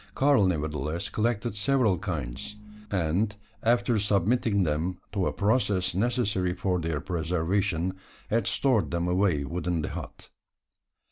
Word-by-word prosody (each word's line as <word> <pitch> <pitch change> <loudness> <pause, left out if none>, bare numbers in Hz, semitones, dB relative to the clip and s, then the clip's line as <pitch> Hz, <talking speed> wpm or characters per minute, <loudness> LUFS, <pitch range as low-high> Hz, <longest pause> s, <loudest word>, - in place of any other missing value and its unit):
Karl 135 -8 +4
nevertheless 75 +1 -2
collected 115 0 -1
several 110 -3 +2
kinds; 80 -2 -4 0.3
and, 95 +3 0 0.3
after 120 0 +2
submitting 100 +1 +2
them 85 +3 -1
to 95 -3 0
a - - 0
process 100 -4 +1
necessary 100 -4 0
for 90 -1 0
their 80 -3 -2
preservation, 90 +2 0 0.4
had 115 +2 +2
stored 130 -7 +2
them 85 0 -1
away 90 -5 +2
within 85 +1 -2
the - - -2
hut. - - -8
95 Hz, 125 wpm, -27 LUFS, 85-105 Hz, 0.4 s, Karl